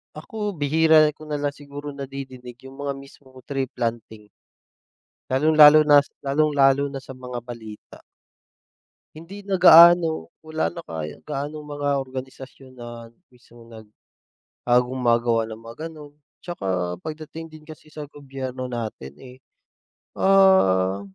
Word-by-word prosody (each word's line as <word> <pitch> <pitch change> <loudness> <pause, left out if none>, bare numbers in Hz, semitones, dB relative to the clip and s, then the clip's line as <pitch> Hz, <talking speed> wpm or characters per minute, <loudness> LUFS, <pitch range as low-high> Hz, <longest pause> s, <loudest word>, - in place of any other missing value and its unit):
ako, 210 -4 -5
bihira 155 +1 +4
ko 155 +1 -15
nalang 145 -1 -2
siguro 145 0 -9
nadidinig 130 -3 -9
yung 135 +1 -13
mga 140 -1 -3
mismong 135 -1 -15
tree 135 -2 -3
planting. 115 -3 -5 1.0
Lalong 155 +4 +2
lalo 150 +1 +10
na 145 -1 +6
s 140 - -10 0.2
lalong 150 +2 +1
lalo 135 0 +4
na 135 -1 -7
sa 130 - -10
mga 125 -1 -8
balita. 110 -3 -11 1.2
Hindi 175 +6 -10
na 190 - +1
gaano. 170 -1 +6 0.2
Wala 155 0 -2
na 170 -1 -9
kaya 75 -2 -6
gaanong 150 +1 -5
mga 145 -1 -4 0.2
organisasyon 130 0 -10
na 120 -1 -10 0.2
mismo 120 -1 -19
nag, 110 -2 -14 0.8
ah, 120 0 +4
gumagawa 120 -2 0
ng 110 - -9
mga 115 0 -12
gano'n. 150 -3 -13 0.3
Tsaka 95 - -3
pagdating 160 +1 -8
din 155 -1 -14
kasi 155 -1 -14
sa 150 -2 -8
gobyerno 130 -3 -7
natin, 110 - -6
eh, 125 0 -13 0.8
ah, 100 - +4
135 Hz, 135 wpm, -23 LUFS, 120-155 Hz, 1.2 s, lalo